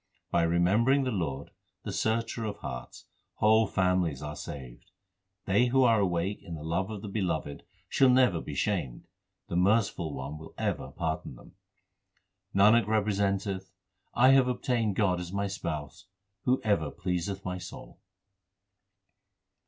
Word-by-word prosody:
By 85 - +3
remembering 100 +11 +3
the 130 - -1
Lord, 75 - -3 0.3
the - - -4
Searcher 115 +1 -1
of 105 -2 -3
hearts, 60 -1 -8 0.3
whole 110 +1 +4
families 90 -7 +1
are 75 0 -5
saved. 65 -4 -9 0.6
They 100 +6 +3
who 130 +2 +3
are 115 -3 +5
awake 95 +1 0
in 85 - -7
the 75 - -8
love 85 +5 -1
of 105 -2 -6
the - - -5
Beloved 85 -8 -2 0.3
shall 135 +8 +4
never 125 -10 +4
be - - -7
shamed; - - -2 0.4
the - - -4
Merciful 90 -5 +1
One 70 +3 -6
will 80 - -12
ever - - -2
pardon 80 -5 -4
them. - - -16 1.0
Nanak 105 +2 +5
representeth, 100 -2 0 0.5
I 125 +2 +6
have 135 -1 +6
obtained 120 -4 0
God 95 -4 +2
as 90 -1 -6
my 100 +1 -1
Spouse 85 -5 -5 0.4
who 130 +1 +3
ever 100 -9 +1
pleaseth 90 +3 -3
my 90 -1 -3
soul. - - -10
95 Hz, 145 wpm, -29 LUFS, 85-110 Hz, 1.0 s, I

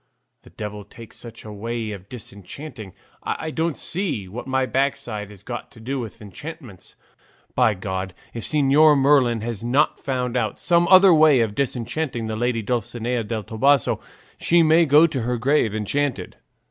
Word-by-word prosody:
The - - -17
devil 105 -1 -7
take 110 +2 -13
such 115 -1 -11
a 105 - -8
way 115 +1 -4
of 100 -1 -9
disenchanting! 115 - -9 0.3
I 160 - -3
don't 160 -1 -1
see 165 - -3
what 115 +8 -7
my 130 0 +1
backside 120 -6 -2
has 100 -2 -14
got 120 +1 -6
to 115 - -15
do 130 +4 -3
with 110 -3 -7
enchantments. 135 - -10 0.6
By 115 -4 +3
God, 95 -1 -4 0.2
if 115 - -5
Señor 150 +1 +4
Merlin 135 -5 +3
has 115 -2 -5
not 135 +6 +2
found 125 -2 -2
out 110 -4 -1
some 170 -1 +2
other 185 0 +8
way 155 -4 +6
of 110 -2 0
disenchanting 125 0 -2
the 110 0 -3
lady 120 0 -1
Dulcinea 120 +1 -2
del 110 0 -4
Toboso, 135 +6 +2 0.4
she 170 0 +4
may 160 +1 +5
go 150 +4 +7
to 145 -6 -2
her 120 +2 -1
grave 120 -3 +1
enchanted." 135 +6 -2
120 Hz, 165 wpm, -22 LUFS, 110-145 Hz, 0.6 s, other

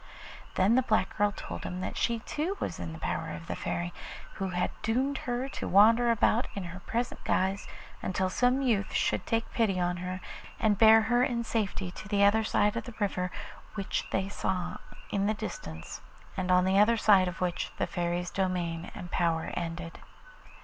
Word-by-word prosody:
Then 195 +4 +4
the 260 - +5
black 215 -6 +1
girl 205 0 +2
told - - -7
him 180 - -4
that - - -4
she 235 -1 0
too 330 - -2
was - - -3
in 85 -2 -4
the 80 - -7
power - - -3
of 85 0 -9
the - - -4
Fairy, 85 0 -3 0.4
who 195 - -3
had 180 0 -1
doomed 260 +5 0
her 245 +2 -1
to - - -5
wander 225 +5 +6
about 230 +1 +3
in 200 - -3
her 180 +1 -7
present 235 +6 -3
guise 190 +2 0 0.3
until 185 0 0
some 250 +7 +2
youth 215 -7 +1
should - - 0
take 225 0 -1
pity 210 -6 +1
on 175 0 0
her 180 +1 -4 0.4
and 210 -3 +2
bear 220 0 +8
her 240 +2 +3
in 240 -2 0
safety 200 -5 -2
to 195 - -9
the 200 -1 +2
other 215 +2 +5
side 210 -1 +2
of 230 - -3
the 240 - -9
river 180 -3 0 0.5
which 195 -2 -2
they 190 0 0
saw 185 -2 -2 0.3
in 200 0 +1
the 215 - +1
distance, 80 - -7 0.3
and 185 -1 -2
on 180 0 +5
the 190 +1 +4
other 230 +3 +5
side 200 -4 +5
of 175 -2 -5
which 180 -1 -1
the - - +1
Fairy's 175 0 -2
domain 180 -3 -1
and 175 - -8
power 165 -2 0
ended. 165 0 -5
195 Hz, 190 wpm, -29 LUFS, 180-225 Hz, 0.5 s, bear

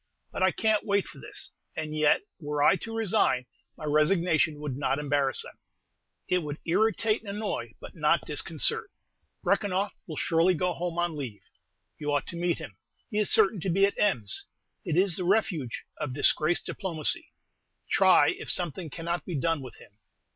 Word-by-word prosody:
But - - -5
I 185 - +5
can't 215 +3 +1
wait 200 -1 +1
for - - -12
this; - - -5 0.2
and 155 -1 -4
yet, 150 -1 +4 0.2
were 145 -2 -1
I - - +6
to 225 0 -7
resign, 190 - +2 0.3
my - - -7
resignation 155 0 +2
would 145 -4 -4
not 140 0 0
embarrass 145 -2 +1
them, - - -12 0.7
it 180 - +2
would 150 -3 -5
irritate 215 +4 +2
and 215 - -9
annoy, 210 +1 -4
but - - -10
not - - +2
disconcert. - - 0 0.5
Brekenoff 200 -1 +1
will 155 -3 -6
surely 170 +2 +3
go 180 +2 0
home 175 0 -4
on 175 -2 0
leave. 125 -8 -6 0.6
You 150 -1 -2
ought 145 -2 +1
to - - -6
meet 175 0 0
him; - - -9 0.3
he 210 - 0
is 210 - +2
certain 210 -2 +4
to 185 - -2
be 195 +3 +4
at 200 - 0
Ems. 120 - +1 0.4
It 155 - -1
is 185 -2 +4
the 185 - 0
refuge 175 - 0
of 145 -4 -4
disgraced 155 +3 +3
diplomacy. 165 -7 -1 0.6
Try - - +5
if - - -5
something 175 -1 -2
cannot 170 +3 -3
be 175 - -5
done 165 +1 0
with 130 -3 -9
him. 100 - -18
170 Hz, 175 wpm, -28 LUFS, 150-195 Hz, 0.7 s, I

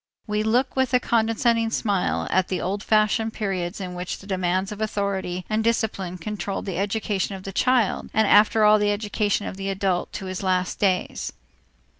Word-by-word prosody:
We 210 -1 -1
look 240 +5 +1
with 260 -1 +2
a - - +5
condescending 230 0 +1
smile 200 -4 0
at 185 0 +2
the 185 - -2
old 200 +2 -2
fashioned 215 +1 +2
periods 190 -3 -3
in 185 -2 -5
which 180 0 -4
the - - -14
demands 185 0 -1
of 210 +1 -7
authority 195 -4 -2
and 215 +1 0
discipline 205 -5 -1
controlled 195 +1 -4
the 185 -3 -3
education 200 -1 -1
of 190 - -9
the 195 - -7
child 250 -1 +1
and 220 -1 +2
after 215 +2 +5
all 210 0 +6
the 205 0 +2
education 205 0 -1
of 190 - -6
the 195 0 -3
adult 190 -2 -1
to 195 - -5
his 185 0 -4
last 185 -1 0
days. 190 -3 0
205 Hz, 185 wpm, -24 LUFS, 185-220 Hz, -, all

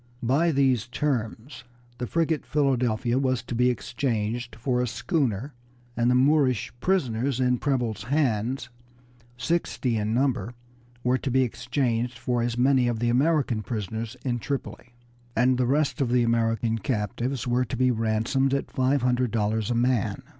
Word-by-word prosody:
By 140 +8 +3
these 130 -5 +2
terms 125 -1 -3 0.4
the 125 - -3
frigate 160 0 0
Philadelphia 125 -4 +1
was 130 -3 0
to 120 - -6
be 125 +1 +3
exchanged 120 -1 -2
for 125 +2 0
a 125 - 0
schooner, 135 - -1 0.4
and 120 0 +2
the 125 - +4
Moorish 130 -3 +2
prisoners 130 -7 0
in 125 -1 +2
Preble's 120 -8 -1
hands, 130 -2 0 0.7
sixty 125 -3 -1
in 105 0 -1
number, 125 -1 0 0.5
were 125 +1 +2
to 135 - -3
be 130 +1 +3
exchanged 120 -1 -1
for 120 0 -1
as 120 0 -1
many 130 0 +3
of 120 -2 0
the 120 +1 0
American 130 -3 +2
prisoners 110 +3 -4
in 120 -2 0
Tripoli, 120 -2 -5 0.4
and 125 0 +3
the 125 - +2
rest 145 +2 +1
of 130 - +1
the 125 0 +3
American 115 -1 +1
captives 120 +3 -2
were 125 +1 +2
to 125 - -5
be 130 0 +3
ransomed 115 +4 +1
at 140 - -3
five 130 +1 +1
hundred 125 0 +2
dollars 110 -1 0
a 120 - 0
man. 120 -2 0
125 Hz, 155 wpm, -26 LUFS, 115-135 Hz, 0.7 s, the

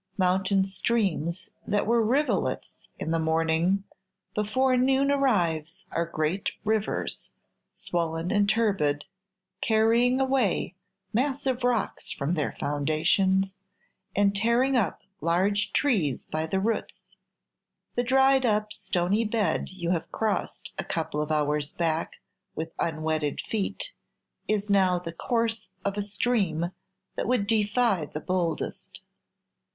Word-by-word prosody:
Mountain 190 +1 +2
streams 190 -4 -1 0.2
that 205 0 +1
were 235 +1 +3
rivulets 270 +7 0
in 160 - -3
the 165 - +2
morning, 165 +4 +2 0.5
before 255 +5 +2
noon 265 +2 +3
arrives 175 - +1
are 170 0 0
great 165 +4 -1 0.2
rivers, 215 -1 -1 0.4
swollen 165 0 -2
and 205 -1 +3
turbid, 195 -10 +1 0.6
carrying 230 +3 +3
away 260 -9 +1 0.4
massive 260 +1 0
rocks 245 -2 0
from 140 +4 -1
their 155 -4 0
foundations, 165 +7 +1 0.6
and 200 0 +3
tearing 235 +5 +2
up 230 -6 0 0.2
large 190 +5 +1
trees 195 - +1
by 155 +1 -1
the 190 +4 0
roots. 220 +3 -2 0.9
The 245 - +1
dried 265 +1 +4
up 210 -2 +1
stony 185 +5 0
bed 210 -6 0
you 175 -2 -3
have 170 -3 -2
crossed 220 -2 -2
a - - 0
couple 160 -2 -2
of 150 +1 -3
hours 150 -1 0
back 165 -1 -1 0.4
with 160 +1 -4
unwetted 155 -2 -1
feet 225 - -2 0.5
is 210 -1 0
now 190 -3 +4
the 170 -2 -6
course 225 +3 -1 0.2
of 200 0 0
a 205 - -1
stream 200 -5 0 0.4
that - - -2
would 245 -4 +2
defy 210 -5 +2
the 150 - -5
boldest. 175 -2 -3
195 Hz, 120 wpm, -27 LUFS, 165-230 Hz, 0.9 s, dried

